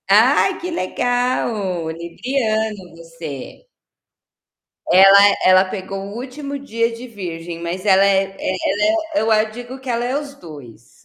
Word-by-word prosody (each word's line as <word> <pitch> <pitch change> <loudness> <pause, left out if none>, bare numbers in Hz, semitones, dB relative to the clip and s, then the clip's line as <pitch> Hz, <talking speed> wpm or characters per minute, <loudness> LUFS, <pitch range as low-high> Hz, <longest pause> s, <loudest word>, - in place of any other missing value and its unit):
Ai, 255 - +4
que 360 - -5
legal! 235 - -1
Libriano 215 +2 -3
você. 165 - -9 1.2
Ela 195 +2 +7
ela 185 +1 +6
pegou 195 +1 -6
o 200 - -9
último 280 +3 -6
dia 230 -4 -1
de 235 +2 -9
virgem, 170 -6 -7
mas 175 +3 -5
ela 195 -1 +5
é 195 -1 +3 0.2
é 185 - -2 0.4
ela 325 -1 -3
é - - +3
eu 225 - 0
a 215 0 +4
digo 240 +4 -9
que 265 - -11
ela 235 0 -1
é 255 +3 -1
os 290 -1 -8
2. 140 - -14
205 Hz, 145 wpm, -19 LUFS, 180-245 Hz, 1.2 s, Ela